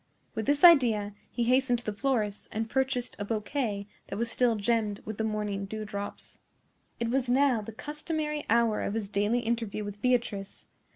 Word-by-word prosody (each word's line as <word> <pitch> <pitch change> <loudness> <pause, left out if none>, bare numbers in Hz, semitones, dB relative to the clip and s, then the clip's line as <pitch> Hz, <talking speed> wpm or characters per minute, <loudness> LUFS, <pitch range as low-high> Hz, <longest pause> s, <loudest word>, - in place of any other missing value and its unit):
With 220 - -3
this 285 +2 +2
idea 235 - +6 0.2
he 240 - -1
hastened 250 +1 +3
to 240 - -8
the 215 - -2
florist's 210 -3 -1
and 220 +1 -2
purchased 260 0 -1
a - - -1
bouquet 210 -1 -2 0.2
that 195 - -5
was 235 +1 -1
still 245 -2 +2
gemmed 210 -1 0
with 215 0 -6
the - - +1
morning 210 -2 -2
dew 215 +1 -5
drops. 205 -1 -6 0.6
It 235 0 -1
was 260 -1 0
now 255 -2 +3
the 210 - -7
customary 300 +4 -3
hour 230 -1 +3
of 200 - -2
his 215 -3 -3
daily 205 +4 +1
interview 225 -3 -2
with 205 0 -7
Beatrice. 235 -6 -1
225 Hz, 180 wpm, -29 LUFS, 210-250 Hz, 0.6 s, idea